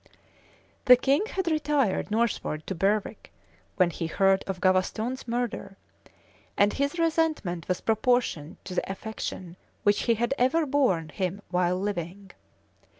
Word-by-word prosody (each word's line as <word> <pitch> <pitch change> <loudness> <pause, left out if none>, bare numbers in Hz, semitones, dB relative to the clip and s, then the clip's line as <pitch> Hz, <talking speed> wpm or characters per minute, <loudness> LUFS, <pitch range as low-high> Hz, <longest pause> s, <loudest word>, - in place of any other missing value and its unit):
[] - - -33
The 250 -2 +9
king 280 - +1
had 380 -4 -3
retired 295 - +1
northward 215 -8 -1
to - - -3
Berwick, 200 +4 -1 0.4
when 180 -3 +3
he 165 0 -4
heard 195 +3 +2
of 190 -2 -3
Gavaston's 215 +8 0
murder; 235 -4 -3 0.8
and 205 +1 +4
his 280 +4 -1
resentment 315 - 0
was 180 -1 -1
proportioned 225 - 0
to 185 - -6
the 185 - -2
affection 190 -4 -6 0.3
which 205 0 +2
he 230 - +5
had 240 +4 0
ever 275 +6 +3
borne 255 - +1
him 190 +4 -3
while 180 0 +1
living. 195 0 -4
205 Hz, 140 wpm, -27 LUFS, 185-260 Hz, 0.8 s, The